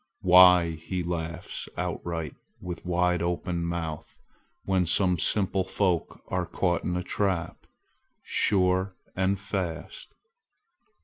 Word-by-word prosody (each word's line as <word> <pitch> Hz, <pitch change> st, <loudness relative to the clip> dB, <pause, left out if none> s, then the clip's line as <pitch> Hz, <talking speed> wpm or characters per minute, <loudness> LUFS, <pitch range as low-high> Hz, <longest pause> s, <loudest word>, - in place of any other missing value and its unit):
Why! 90 Hz, -2 st, +7 dB
he 85 Hz, +3 st, -4 dB
laughs 85 Hz, -1 st, -4 dB
outright 85 Hz, -3 st, -3 dB, 0.3 s
with 90 Hz, -1 st, -7 dB
wide 90 Hz, 0 st, +1 dB
open 85 Hz, 0 st, -2 dB
mouth 80 Hz, -3 st, -5 dB, 0.5 s
when 95 Hz, -2 st, +1 dB
some 90 Hz, 0 st, +2 dB
simple 95 Hz, +1 st, +1 dB
folk 95 Hz, -2 st, -1 dB
are 90 Hz, -2 st, -2 dB
caught 90 Hz, 0 st, 0 dB
in 90 Hz, 0 st, -1 dB
a 90 Hz, -, -2 dB
trap, 90 Hz, -3 st, -2 dB, 0.6 s
sure 95 Hz, -1 st, +1 dB, 0.2 s
and 95 Hz, +1 st, +1 dB
fast. 90 Hz, -4 st, -5 dB
90 Hz, 110 wpm, -27 LUFS, 85-95 Hz, 0.6 s, Why